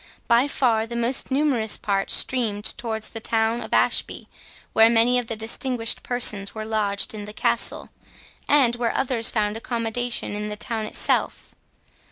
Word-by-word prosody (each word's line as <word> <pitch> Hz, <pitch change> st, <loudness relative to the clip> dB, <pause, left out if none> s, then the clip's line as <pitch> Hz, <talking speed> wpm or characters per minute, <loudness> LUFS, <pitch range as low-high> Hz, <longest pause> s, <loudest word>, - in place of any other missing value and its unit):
By 235 Hz, +3 st, +4 dB
far 230 Hz, -6 st, +1 dB
the 235 Hz, -, -7 dB
most 235 Hz, +3 st, 0 dB
numerous 265 Hz, -6 st, +1 dB
part 195 Hz, -1 st, -1 dB
streamed 220 Hz, -5 st, +1 dB
towards 220 Hz, -2 st, -5 dB
the 225 Hz, -, -6 dB
town 225 Hz, +1 st, 0 dB
of -, -, -8 dB
Ashby, -, -, +1 dB, 0.5 s
where 225 Hz, 0 st, +6 dB
many 235 Hz, +2 st, +3 dB
of 245 Hz, -, -6 dB
the 225 Hz, -, -4 dB
distinguished 225 Hz, +1 st, -1 dB
persons 210 Hz, -5 st, +1 dB
were 215 Hz, 0 st, -5 dB
lodged 210 Hz, -2 st, 0 dB
in 210 Hz, -1 st, -7 dB
the 210 Hz, -, -9 dB
castle, -, -, 0 dB, 0.6 s
and 265 Hz, -5 st, +4 dB
where 235 Hz, -1 st, -1 dB
others 250 Hz, -4 st, +2 dB
found 210 Hz, -2 st, -1 dB
accommodation 235 Hz, 0 st, -3 dB
in 210 Hz, 0 st, -4 dB
the 210 Hz, -, -6 dB
town 220 Hz, 0 st, -3 dB
itself. -, -, -2 dB
225 Hz, 160 wpm, -23 LUFS, 215-245 Hz, 0.6 s, where